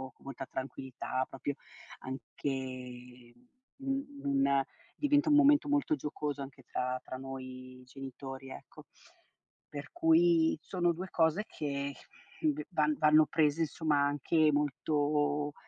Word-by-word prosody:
con - - -23
molta 135 0 -6
tranquillità 130 -1 -4
proprio, 135 +2 -3 0.5
anche 125 -2 -6 0.5
un 270 0 0 0.2
una 140 0 +3 0.3
diventa 290 +1 +3
un 295 - +6
momento 295 0 +6
molto 290 +2 +2
giocoso 150 - -4
anche 135 -1 -9
tra 125 +1 -2
tra 130 - -6
noi 130 -1 -8
genitori, 135 0 -8
ecco. - - -11 0.9
Per 145 0 -6
cui 165 0 +4
sono 175 +1 +1
2 180 +3 -5
cose 165 +7 +2
che 140 -1 -3 0.5
v 305 -1 +1
van 155 -3 +2
vanno 155 0 +6
prese 155 0 +2
insomma 155 -2 +1
anche 150 +2 +3
molto, 145 0 +1
145 Hz, 120 wpm, -32 LUFS, 135-160 Hz, 0.9 s, un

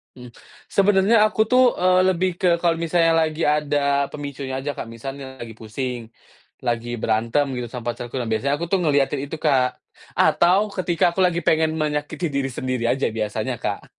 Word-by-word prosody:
Mhm, 125 -1 -11 0.4
sebenarnya 200 +2 +3
aku 215 0 0
tuh, 255 -1 +5
eee, 185 0 +4
lebih 185 0 +1
ke 185 - +2
kalau 170 -1 +2
misalnya 165 0 +2
lagi 155 0 -2
ada 150 -1 -1 0.4
pemicunya 140 -2 -6
aja 145 +2 -2
Kak - - -4
misalnya 135 +2 -8
lagi 115 -1 -7
pusing, 125 +3 -4 0.7
lagi 120 -1 -1
berantem 115 +6 +1
gitu 125 -1 -4
sama 120 0 -4
pacarku 120 +2 -8
nah 125 - -1
biasanya 140 +6 0
aku 170 - -4
tuh 195 - +3
ngelihatin 145 -3 +1
itu 145 +3 -6
Kak, 130 -4 +2 0.4
atau 180 +3 +4 0.2
ketika 175 -3 0
aku 190 - -2
lagi 170 -1 0
pengen 160 0 +2
menyakiti 150 +3 -2
diri 140 -1 -1
sendiri 130 -1 -3
aja 135 - -1
biasanya, 110 +3 -2
Kak. 100 - -3
145 Hz, 170 wpm, -22 LUFS, 125-170 Hz, 0.7 s, tuh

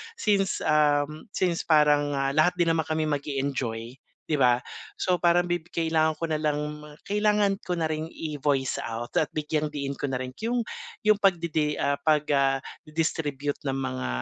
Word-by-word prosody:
Since, 200 - +1
um, 150 +2 +2
since 175 -2 0
parang, 150 -2 +4
ah, 135 0 0
lahat 165 +4 +4
din 175 - +3
naman 160 -1 +1
kami 155 0 0
mag-e-enjoy, 135 -5 -2 0.3
'di 155 - +1
ba, 125 -3 +4 0.4
so 185 - +2
parang 175 0 +3
bi 175 -1 -1
kailangan 160 -2 +1
ko 165 - -1
na 155 - 0
lang 150 -1 0 0.5
kailangan 210 -1 +2
ko 180 -1 -2
na 160 - +1
ring 155 +1 -4
i-voice 145 -4 -1
out 115 +1 -5
at 155 - +2
bigyang-diin 150 -2 -2
ko - - -12
na 125 - -1
rin 130 0 -6
'yong 240 +2 -1 0.5
'yong 215 - +7
pag-di-di, 165 -5 +1
ah, 140 0 +2
pag, 150 +1 +1
ah, 135 -1 +3 0.2
di-distribute 150 -2 -2
ng 135 -1 -1
mga 65 - -3
150 Hz, 165 wpm, -26 LUFS, 140-165 Hz, 0.5 s, yong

